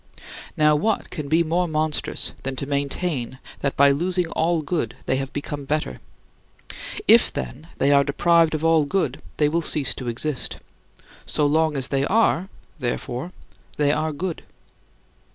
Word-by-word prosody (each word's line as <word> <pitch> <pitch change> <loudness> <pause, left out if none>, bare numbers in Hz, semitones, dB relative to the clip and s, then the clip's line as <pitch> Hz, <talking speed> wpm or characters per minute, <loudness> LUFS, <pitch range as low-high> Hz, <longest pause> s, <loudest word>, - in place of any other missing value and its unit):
Now 150 0 +5
what 215 +9 0
can 150 -5 -5
be 160 +3 +3
more 175 +2 0
monstrous 155 -1 -1
than 135 0 -4
to 140 - -4
maintain 140 -1 -2 0.2
that 140 - -2
by 140 0 +6
losing 180 +5 +1
all 165 0 0
good 145 -7 -2
they 130 - +1
have 135 0 -4
become 145 0 -5
better? 140 - -2 1.1
If, - - +7
then, - - -6
they 140 - +3
are 140 0 +6
deprived 165 +3 +3
of 155 +1 -2
all 165 -2 +4
good, 145 -5 -1 0.2
they 150 - +3
will 165 +3 0
cease 150 -4 +2
to 130 - -7
exist. 125 +4 -2 0.7
So 150 - +1
long 155 0 +2
as 130 -1 0
they 135 -1 +1
are, 190 0 +2 0.3
therefore, 125 +4 -3 0.5
they 145 -1 +3
are 155 +1 0
good. 170 +3 -4
150 Hz, 155 wpm, -23 LUFS, 140-165 Hz, 1.1 s, If